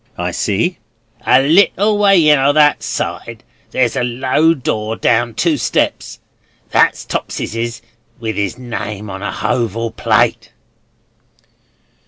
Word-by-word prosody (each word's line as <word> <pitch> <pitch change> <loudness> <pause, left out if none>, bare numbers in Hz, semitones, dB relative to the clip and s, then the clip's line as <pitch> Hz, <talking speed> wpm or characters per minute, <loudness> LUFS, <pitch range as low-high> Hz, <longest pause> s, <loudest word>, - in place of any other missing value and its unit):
"I - - -2
see." 110 - -1 0.5
"A 130 +1 +5
little 200 +6 +3
way 195 -6 +4
in, 150 -2 +5
o' 140 +2 +3
that 150 -1 +4
side, - - -5 0.3
there's 125 -3 0
a - - 0
low 130 +7 +1
door, 110 -5 -3
down 120 0 +1
two 165 +1 +1
steps. 115 - -1 0.5
That's - - +2
Topeseses 115 0 -4 0.4
with 110 -2 -4
'is 100 +2 -2
name 105 -4 -6
on 95 0 -7
a 100 - -3
hoval 115 -1 -2
plate." - - 0
120 Hz, 125 wpm, -16 LUFS, 110-150 Hz, 0.5 s, A